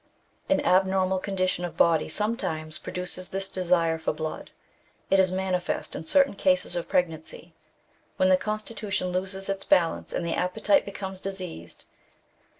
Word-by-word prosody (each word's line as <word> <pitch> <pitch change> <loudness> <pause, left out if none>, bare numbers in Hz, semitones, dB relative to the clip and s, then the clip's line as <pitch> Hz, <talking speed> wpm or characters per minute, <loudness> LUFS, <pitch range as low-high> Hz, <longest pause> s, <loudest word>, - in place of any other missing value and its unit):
An 285 0 +3
abnormal 190 -5 +3
condition 185 -2 -1
of 175 - -5
body 165 -2 +3
sometimes 160 -6 -2
produces 180 0 -4
this 195 0 -2
desire 170 -3 +1
for 160 - 0
blood. 155 +1 -5 0.6
It 195 - +5
is 185 -1 +4
manifest 185 -1 -2
in - - -6
certain 275 - +4
cases 185 -3 +2
of 175 - -3
pregnancy, 165 -1 -2 0.6
when 185 - +4
the 185 - +7
constitution 215 -2 -3
loses 190 +1 -2
its 195 0 -2
balance, 165 -2 +2
and 170 - -2
the 165 - -1
appetite 185 +2 +2
becomes 190 -1 -6
diseased. 185 - -6
185 Hz, 145 wpm, -27 LUFS, 170-195 Hz, 0.6 s, the